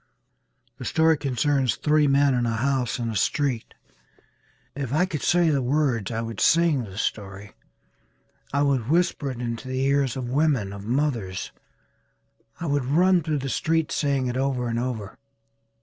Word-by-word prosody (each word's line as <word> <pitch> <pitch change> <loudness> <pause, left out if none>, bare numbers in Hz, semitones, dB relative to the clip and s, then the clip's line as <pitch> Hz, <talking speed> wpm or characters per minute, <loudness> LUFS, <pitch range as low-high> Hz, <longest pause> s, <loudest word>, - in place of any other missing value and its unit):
The - - -6
story 160 0 +3
concerns 135 -2 0
three 150 -1 +2
men 140 0 +3
in 120 -1 +1
a 115 - -1
house 130 +1 0
in 115 -2 -3
a - - -6
street. 130 +2 -1 1.0
If 135 -3 -4
I 160 +6 +3
could 160 -6 -4
say 175 -2 +3
the 140 -2 +1
words 125 -5 0
I 115 -1 -2
would 115 -3 -6
sing 165 -7 +3
the 95 -2 -11
story. 100 -1 -4 1.0
I 140 +1 +1
would 135 -4 0
whisper 165 -3 +1
it 125 -2 -6
into 115 0 -4
the 130 0 -2
ears 140 -2 +1
of 125 -2 -4
women, 130 -7 +1
of 100 0 -9
mothers. 120 -8 -1 1.1
I 170 - -4
would 145 -4 0
run 175 +6 +3
through 155 -1 -1
the - - -2
streets 160 +3 0
saying 140 -3 0
it 125 0 -2
over 130 -2 -1
and 115 0 -1
over. 115 -5 -4
135 Hz, 165 wpm, -24 LUFS, 115-150 Hz, 1.1 s, story